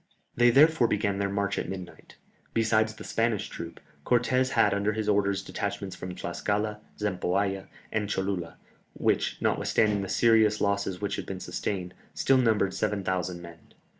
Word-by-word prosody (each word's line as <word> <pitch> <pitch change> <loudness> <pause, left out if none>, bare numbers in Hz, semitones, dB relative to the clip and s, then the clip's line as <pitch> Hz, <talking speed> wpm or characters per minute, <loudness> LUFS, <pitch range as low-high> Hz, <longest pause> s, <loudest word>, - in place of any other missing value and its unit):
They 120 0 +5
therefore 140 0 +5
began 100 -2 0
their 100 0 0
march 100 0 -1
at - - -4
midnight. 95 -2 -9 0.4
Besides 110 -1 +2
the - - -10
Spanish 115 -2 0
troops, - - -8 0.2
Cortès 125 +1 +2
had - - +4
under 100 +1 0
his 110 0 -3
orders 100 -1 +2
detachments 100 -1 -4
from 90 -1 -7
Tlascala, 105 +2 -2 0.2
Zempoalla, 95 -1 -1 0.2
and 105 -2 -1
Cholula, 95 -4 -2 0.4
which, - - +1
notwithstanding 105 -2 +2
the 95 - -5
serious 110 -2 +4
losses 100 -2 0
which 100 -1 -2
had - - -5
been 95 -1 -5
sustained, 90 0 -4 0.2
still 135 - +3
numbered 110 -5 +2
7000 95 -4 -2
men. 85 -1 -11
100 Hz, 150 wpm, -28 LUFS, 95-110 Hz, 0.4 s, They